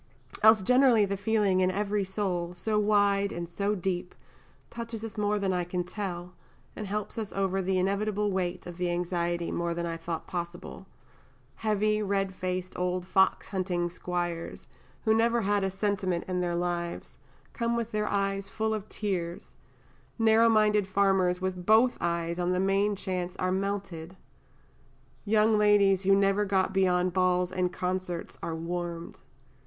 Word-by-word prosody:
Else 220 Hz, -2 st, +7 dB
generally 250 Hz, -1 st, +5 dB
the 200 Hz, 0 st, -2 dB
feeling 200 Hz, -2 st, +1 dB
in 185 Hz, 0 st, +3 dB
every 205 Hz, +1 st, 0 dB
soul, 185 Hz, -3 st, -2 dB
so 215 Hz, +3 st, 0 dB
wide 205 Hz, -1 st, +3 dB
and 170 Hz, 0 st, -4 dB
so 200 Hz, +4 st, -1 dB
deep, 180 Hz, -1 st, -3 dB, 0.6 s
touches 230 Hz, -1 st, -5 dB
us 220 Hz, -, -7 dB
more 210 Hz, 0 st, +1 dB
than 195 Hz, -2 st, 0 dB
I 180 Hz, -1 st, 0 dB
can 180 Hz, +1 st, -2 dB
tell, 180 Hz, -1 st, -5 dB, 0.4 s
and 210 Hz, -, -5 dB
helps 210 Hz, +3 st, -3 dB
us 215 Hz, -2 st, -4 dB
over 195 Hz, 0 st, 0 dB
the 190 Hz, 0 st, 0 dB
inevitable 205 Hz, +2 st, 0 dB
weight 180 Hz, -2 st, -2 dB
of 175 Hz, -1 st, -8 dB
the 180 Hz, -1 st, -1 dB
anxiety 175 Hz, -1 st, -1 dB
more 170 Hz, 0 st, -1 dB
than 170 Hz, 0 st, -2 dB
I 165 Hz, -1 st, -3 dB
thought 165 Hz, 0 st, -5 dB
possible 175 Hz, 0 st, -6 dB, 0.7 s
heavy, 215 Hz, 0 st, +1 dB
redfaced, 190 Hz, -2 st, -2 dB
old 180 Hz, 0 st, -1 dB
fox 190 Hz, +1 st, +2 dB
hunting 180 Hz, -3 st, -1 dB
Squires, 175 Hz, -1 st, -4 dB, 0.4 s
who 220 Hz, -, +4 dB
never 230 Hz, +1 st, +2 dB
had 205 Hz, -1 st, +1 dB
a 195 Hz, -, +1 dB
"sentiment" 195 Hz, -2 st, -1 dB
in 180 Hz, -1 st, -1 dB
their 175 Hz, -1 st, -1 dB
lives, 175 Hz, 0 st, -3 dB, 0.3 s
come 235 Hz, -1 st, -1 dB
with 235 Hz, -1 st, -2 dB
their 210 Hz, 0 st, -1 dB
eyes 195 Hz, -1 st, -1 dB
full 220 Hz, +1 st, -1 dB
of 215 Hz, -1 st, -5 dB
tears; 180 Hz, -5 st, -4 dB, 0.6 s
narrow 225 Hz, 0 st, +5 dB
minded 210 Hz, -2 st, +3 dB
Farmers 190 Hz, -2 st, +2 dB
with 185 Hz, -1 st, -3 dB
both 220 Hz, +6 st, +5 dB
eyes 170 Hz, 0 st, -1 dB
on 180 Hz, +1 st, +1 dB
the 180 Hz, -, 0 dB
main 195 Hz, +2 st, +2 dB
chance 185 Hz, -2 st, -3 dB
are 185 Hz, 0 st, -1 dB
melted; 190 Hz, -3 st, -3 dB, 1.1 s
young 215 Hz, 0 st, +3 dB
ladies 200 Hz, -2 st, +4 dB
who 195 Hz, 0 st, +4 dB
never 195 Hz, +1 st, +3 dB
got 190 Hz, -1 st, +1 dB
beyond 180 Hz, -2 st, +2 dB
balls 180 Hz, -1 st, +2 dB
and 185 Hz, -1 st, 0 dB
concerts 180 Hz, -1 st, -3 dB
are 165 Hz, -1 st, -3 dB
warmed. 170 Hz, 0 st, -5 dB
190 Hz, 160 wpm, -28 LUFS, 180-210 Hz, 1.1 s, Else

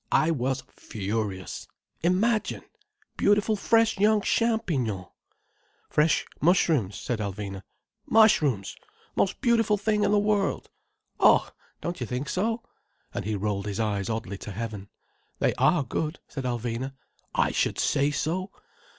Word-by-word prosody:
I 160 Hz, +1 st, +4 dB
was 135 Hz, -2 st, -1 dB
furious. 100 Hz, -2 st, -4 dB, 0.3 s
Imagine!—beautiful 220 Hz, -, 0 dB
fresh 225 Hz, 0 st, +2 dB
young 210 Hz, +1 st, +4 dB
champignons—" 165 Hz, -, 0 dB, 0.9 s
"Fresh 150 Hz, +1 st, +3 dB, 0.2 s
mushrooms," 155 Hz, -, +3 dB
said 120 Hz, -3 st, -3 dB
Alvina. 100 Hz, -1 st, -4 dB, 0.5 s
"Mushrooms—most 185 Hz, -, +1 dB
beautiful 230 Hz, -4 st, +3 dB
things 210 Hz, +1 st, +1 dB
in 200 Hz, -, +2 dB
the 210 Hz, -, +4 dB
world. 205 Hz, -1 st, 0 dB, 0.5 s
Oh! -, -, +5 dB, 0.3 s
don't 170 Hz, -5 st, -4 dB
you 120 Hz, -, -2 dB
think 125 Hz, +5 st, -3 dB
so?" 225 Hz, +5 st, -1 dB, 0.5 s
And -, -, -4 dB
he 110 Hz, 0 st, -1 dB
rolled 100 Hz, 0 st, -2 dB
his 100 Hz, 0 st, -3 dB
eyes 105 Hz, -2 st, -1 dB
oddly 110 Hz, -3 st, -3 dB
to 105 Hz, -, -7 dB
heaven. 105 Hz, -1 st, -5 dB, 0.5 s
"They -, -, +2 dB
are 165 Hz, -5 st, +4 dB
good," 155 Hz, +5 st, -3 dB
said 135 Hz, -3 st, -6 dB
Alvina. 120 Hz, +2 st, -2 dB, 0.4 s
"I -, -, +3 dB
should -, -, 0 dB
say 140 Hz, +1 st, +2 dB
so. 170 Hz, +6 st, -2 dB
145 Hz, 125 wpm, -27 LUFS, -, 0.9 s, Oh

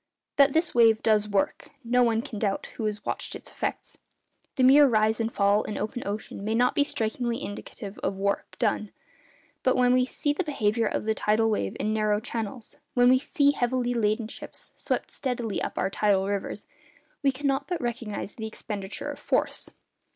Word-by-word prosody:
That 280 Hz, -1 st, +6 dB
this 320 Hz, 0 st, +2 dB
wave 225 Hz, -2 st, +5 dB
'does 210 Hz, -1 st, +3 dB
work,' 200 Hz, -1 st, -1 dB
no 250 Hz, +1 st, +2 dB
one 230 Hz, -1 st, +2 dB
can 245 Hz, -7 st, -6 dB
doubt 200 Hz, -2 st, -1 dB
who 225 Hz, -, -3 dB
has 210 Hz, -1 st, -3 dB
watched -, -, -3 dB
its -, -, -10 dB
effects. -, -, -4 dB, 0.6 s
The 260 Hz, -, +2 dB
mere 280 Hz, +3 st, +8 dB
rise 220 Hz, -2 st, +2 dB
and 225 Hz, 0 st, -1 dB
fall 200 Hz, 0 st, +3 dB
in 215 Hz, -, -5 dB
open 220 Hz, +4 st, -3 dB
ocean 205 Hz, -1 st, -5 dB
may 220 Hz, +2 st, 0 dB
not 245 Hz, +2 st, +3 dB
be 285 Hz, -, +3 dB
strikingly 235 Hz, -2 st, -2 dB
indicative 205 Hz, 0 st, -7 dB
of -, -, -2 dB
'work 200 Hz, +1 st, -2 dB
done;' 210 Hz, -, 0 dB, 0.7 s
but 255 Hz, -, +2 dB
when 250 Hz, 0 st, +4 dB
we 255 Hz, 0 st, +4 dB
see 290 Hz, +3 st, -1 dB
the 335 Hz, -, -1 dB
behaviour 230 Hz, -7 st, 0 dB
of -, -, -2 dB
the 220 Hz, -, +2 dB
tidal 220 Hz, +1 st, +2 dB
wave 100 Hz, -, -1 dB
in 215 Hz, -, 0 dB
narrow 215 Hz, -1 st, +2 dB
channels, 225 Hz, +1 st, -5 dB, 0.2 s
when 245 Hz, 0 st, +6 dB
we 255 Hz, 0 st, +6 dB
see 285 Hz, 0 st, +2 dB
heavily 245 Hz, -2 st, 0 dB
laden 215 Hz, -1 st, +1 dB
ships -, -, -10 dB
swept -, -, -2 dB
steadily 245 Hz, -5 st, -3 dB
up -, -, -4 dB
our -, -, 0 dB
tidal 200 Hz, -2 st, +2 dB
rivers, 200 Hz, 0 st, -3 dB, 0.6 s
we 275 Hz, -, +3 dB
cannot 275 Hz, +1 st, -1 dB
but 355 Hz, -, -2 dB
recognise 235 Hz, -4 st, -4 dB
the 220 Hz, -1 st, -5 dB
expenditure 205 Hz, -3 st, -5 dB
of -, -, -9 dB
force. -, -, 0 dB
225 Hz, 190 wpm, -27 LUFS, 210-255 Hz, 0.7 s, mere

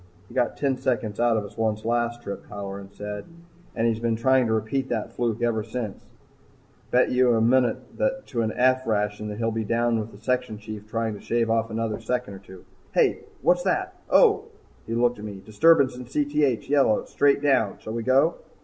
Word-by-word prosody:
"He -, -, -13 dB
got 125 Hz, -2 st, 0 dB
ten 135 Hz, -2 st, 0 dB
seconds 120 Hz, -5 st, -2 dB
out 120 Hz, -1 st, +3 dB
of 105 Hz, -, -2 dB
us 100 Hz, +2 st, -12 dB
once 110 Hz, -1 st, -1 dB
last 120 Hz, 0 st, -1 dB
trip," 100 Hz, -, -7 dB
Halloran 100 Hz, -1 st, -7 dB
said. 105 Hz, 0 st, -6 dB, 0.5 s
"And 115 Hz, -, 0 dB
he's 115 Hz, -1 st, +1 dB
been 115 Hz, -1 st, 0 dB
trying 130 Hz, +2 st, +3 dB
to 110 Hz, -, +1 dB
repeat 120 Hz, +5 st, -1 dB
that 115 Hz, -1 st, -2 dB
fluke 120 Hz, -1 st, -1 dB
ever 115 Hz, -2 st, +1 dB
since. 110 Hz, -2 st, -5 dB, 0.9 s
Bet 125 Hz, -, +3 dB
you 125 Hz, -1 st, +4 dB
a -, -, +2 dB
munit 120 Hz, +1 st, +3 dB, 0.5 s
to 120 Hz, -3 st, -2 dB
an 110 Hz, -1 st, 0 dB
'F' 130 Hz, +1 st, +2 dB
ration 105 Hz, -1 st, -1 dB
that 105 Hz, 0 st, -5 dB
he'll 115 Hz, 0 st, 0 dB
be 110 Hz, 0 st, -2 dB
down 115 Hz, +1 st, +1 dB
with 110 Hz, +1 st, -5 dB
the -, -, -13 dB
section 125 Hz, 0 st, -1 dB
chief 105 Hz, 0 st, -9 dB
trying 115 Hz, 0 st, -2 dB
to 105 Hz, -, -9 dB
shave 115 Hz, -1 st, 0 dB
off 115 Hz, 0 st, +1 dB
another 110 Hz, -1 st, -2 dB
second 125 Hz, -4 st, -2 dB
or 95 Hz, -, -9 dB
two. 95 Hz, -1 st, -14 dB, 0.3 s
Hey! -, -, +3 dB, 0.2 s
what's 180 Hz, 0 st, +4 dB
that 370 Hz, -, 0 dB, 0.2 s
oh 435 Hz, -3 st, +5 dB, 0.2 s
..." -, -, -31 dB
He 115 Hz, -, -2 dB
looked 120 Hz, -1 st, +2 dB
at 105 Hz, -, -7 dB
me. 100 Hz, -2 st, -7 dB
"Disturbance 140 Hz, +4 st, +4 dB
in 125 Hz, 0 st, -8 dB
Cth 145 Hz, -1 st, 0 dB
yellow, 135 Hz, -7 st, +3 dB
straight 140 Hz, 0 st, +2 dB
down 135 Hz, -8 st, +2 dB
shall 110 Hz, -, -7 dB
we 115 Hz, -, -2 dB
go?" 135 Hz, +8 st, +3 dB
115 Hz, 205 wpm, -25 LUFS, 110-130 Hz, 0.9 s, oh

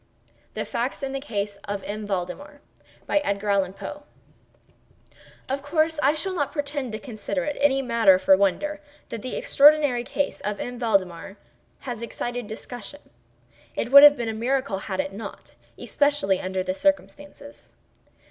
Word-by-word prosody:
THE -, -, -3 dB
FACTS 250 Hz, +4 st, -3 dB
IN 270 Hz, -, -2 dB
THE 275 Hz, -, -3 dB
CASE 205 Hz, -6 st, -4 dB
OF 200 Hz, -1 st, -4 dB
M. 210 Hz, 0 st, -5 dB
VALDEMAR 205 Hz, +11 st, -5 dB, 2.9 s
Of 275 Hz, +1 st, -2 dB
course 310 Hz, +2 st, 0 dB
I 285 Hz, +2 st, +3 dB
shall 375 Hz, +5 st, -2 dB
not 290 Hz, -6 st, -1 dB
pretend 285 Hz, -4 st, -3 dB
to -, -, -2 dB
consider 245 Hz, +3 st, -4 dB
it 295 Hz, -1 st, -3 dB
any 270 Hz, -1 st, +3 dB
matter 230 Hz, -6 st, +5 dB
for 190 Hz, +1 st, +5 dB
wonder, 295 Hz, +11 st, 0 dB, 0.3 s
that 230 Hz, -, -5 dB
the 255 Hz, -, -5 dB
extraordinary 290 Hz, -4 st, +4 dB
case 285 Hz, +3 st, -2 dB
of 210 Hz, -1 st, -3 dB
M. 245 Hz, 0 st, -5 dB
Valdemar 195 Hz, -4 st, -1 dB, 0.4 s
has 240 Hz, -4 st, -6 dB
excited 240 Hz, 0 st, -4 dB
discussion. 245 Hz, +5 st, -9 dB, 0.6 s
It 235 Hz, -, -3 dB
would 280 Hz, +1 st, +11 dB
have 290 Hz, 0 st, +9 dB
been 235 Hz, -, -3 dB
a 225 Hz, -, -2 dB
miracle 245 Hz, -2 st, -1 dB
had 190 Hz, -1 st, -5 dB
it 190 Hz, -, -2 dB
not—especially 210 Hz, +2 st, -2 dB
under 185 Hz, 0 st, -2 dB
the 185 Hz, 0 st, -2 dB
circumstances. 290 Hz, +3 st, -3 dB
245 Hz, 140 wpm, -24 LUFS, 205-285 Hz, 2.9 s, would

